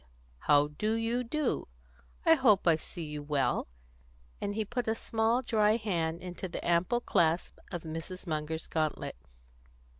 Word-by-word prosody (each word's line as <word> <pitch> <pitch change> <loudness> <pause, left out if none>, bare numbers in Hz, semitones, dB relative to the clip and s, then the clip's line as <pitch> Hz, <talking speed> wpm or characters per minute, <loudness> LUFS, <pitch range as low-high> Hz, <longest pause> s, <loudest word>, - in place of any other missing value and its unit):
how 145 - +4
do 215 +1 +1
you 230 +2 0
do? 290 +3 -1 0.6
I 325 - +8
hope 235 - +4
I 165 - +7
see 165 +2 -7
you 150 -1 -5
well," 145 -2 0 0.7
and 205 0 -2
he 220 0 0
put 245 +2 -3
a 220 - +2
small 225 +3 +1
dry 215 -2 +3
hand 170 -7 -1
into 180 +1 -5
the 175 - -6
ample 180 +8 +2
clasp 170 -5 +1
of 175 -3 -4
Mrs. 165 +4 -6
Munger's 160 -1 -2
gauntlet. 155 -3 -2
185 Hz, 150 wpm, -31 LUFS, 160-225 Hz, 0.7 s, I